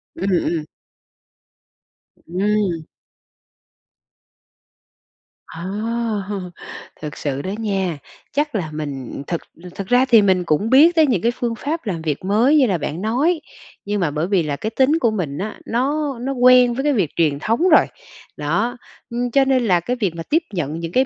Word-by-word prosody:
Ừm, 190 +4 -2 0.2
ừm. 165 -3 -1 1.6
Ừm! 195 -1 0 2.7
Ờ! 165 +1 -9 1.4
Thực 150 -1 -6
sự 140 -2 -3
đó 190 - -4
nha, 195 -6 -1 0.3
chắc 295 -1 -1
là 175 -7 -2
mình 140 -3 -5
thực 170 - -2 0.3
thực 195 -1 -5
ra 245 +1 +4
thì 235 -4 +6
mình 190 -3 +2
cũng 175 +6 0
biết 305 +7 +6
tới 320 -2 +5
những 225 -10 +1
cái 235 - +2
phương 240 -1 -3
pháp 295 +4 -4
làm 170 -4 -2
việc 155 +1 -3
mới 225 +9 +3
như 275 - +5
là 190 -5 +1
bạn 155 +2 -4
nói, 285 - +1 0.4
nhưng 205 0 -1
mà 165 -5 0
bởi 155 +3 -1
vì 190 -3 +2
là 150 -2 -2
cái 215 - -3
tính 265 +7 +2
của 230 -6 +2
mình 160 -9 -3
á, 210 +3 -5
nó 280 +5 0
nó 265 +3 -2
quen 250 -1 +6
với 270 - -2
cái 295 0 +2
việc 195 - +1
truyền 150 -4 +1
thống 230 - +1
rồi. 310 - +6 0.5
Đó, 205 - -1 0.3
ưm, 240 +1 -2
cho 275 +2 +4
nên 260 -2 +2
là 180 -5 +3
cái 245 +9 -2
việc 200 -9 -1
mà 165 - -5
tiếp 320 - +1
nhận 160 -3 -3
những 165 -1 -5
cái 260 +7 +3
210 Hz, 175 wpm, -20 LUFS, 170-255 Hz, 2.7 s, thì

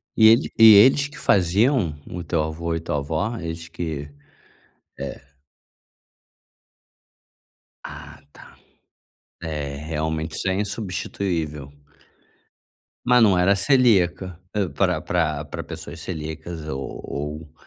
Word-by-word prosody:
E 110 - +7
ele 115 +2 +4
e 110 -1 +10
eles 135 +7 +6
que 150 - -14
faziam? 95 - +2
O 90 0 -6
teu 80 -1 0
avô 80 +2 -3
e - - -2
tua 80 -2 -3
avó, 80 +11 -2
eles 85 -3 -6
que, 80 -4 -5 0.9
é. - - -6 2.7
Ah - - -10
tá, - - -16 0.9
é 75 -3 -4
realmente 80 +1 -3
isso - - -1
é 95 - 0
insubstituível. 90 -7 -3 1.3
Mas 125 0 +5
não 100 -5 +5
era 95 +3 +4
celíaca, 95 - +2 0.2
hã, 100 -5 0
pra 70 - 0
pra - - -1
pra - - -6
pessoas - - -9
celíacas 80 0 -6
ou 65 -2 -5
ou 75 +2 -6
85 Hz, 115 wpm, -23 LUFS, 80-100 Hz, 2.7 s, e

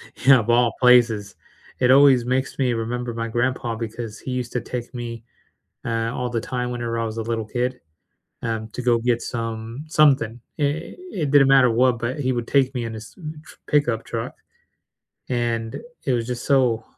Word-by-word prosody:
you 135 - +4
know, 130 - +7
of 110 - -6
all 120 -1 +4
places. 120 -5 +4 0.4
It 125 0 +4
always 135 -3 +6
makes 130 +1 -1
me 130 -3 +1
remember 120 +1 -3
my 115 0 -3
grandpa 120 0 -1
because 115 -1 -6
he 130 - -6
used 125 -1 -3
to 125 - -1
take 120 -1 -6
me, 115 -1 -6 0.6
uh, 115 -1 -1
all 125 0 -2
the 120 -1 -2
time 125 +1 -3
whenever 120 -1 -3
I 115 - 0
was 110 0 -4
a - - -1
little 115 0 -2
kid, 125 +3 -2 0.6
um, 110 -1 -3
to 125 - -6
go 120 -1 +3
get 120 0 +1
some 115 +2 -5
something. 135 -7 +3 0.2
I 145 +3 -1 0.2
it 155 -6 -2
didn't 140 -2 +6
matter 135 -2 +6
what, 125 +1 +3
but 120 +5 -3
he 130 -1 +1
would 120 -2 -2
take 135 -1 +2
me 120 -3 -3
in 115 - -5
his 110 0 -9
tr 155 -3 -10
pickup 120 -6 +1
truck, 115 -1 -4 1.0
and 115 -2 -1 0.3
it 135 - +2
was 120 -2 0
just 125 -1 -4
so 125 -5 +3
120 Hz, 190 wpm, -23 LUFS, 115-130 Hz, 1.0 s, know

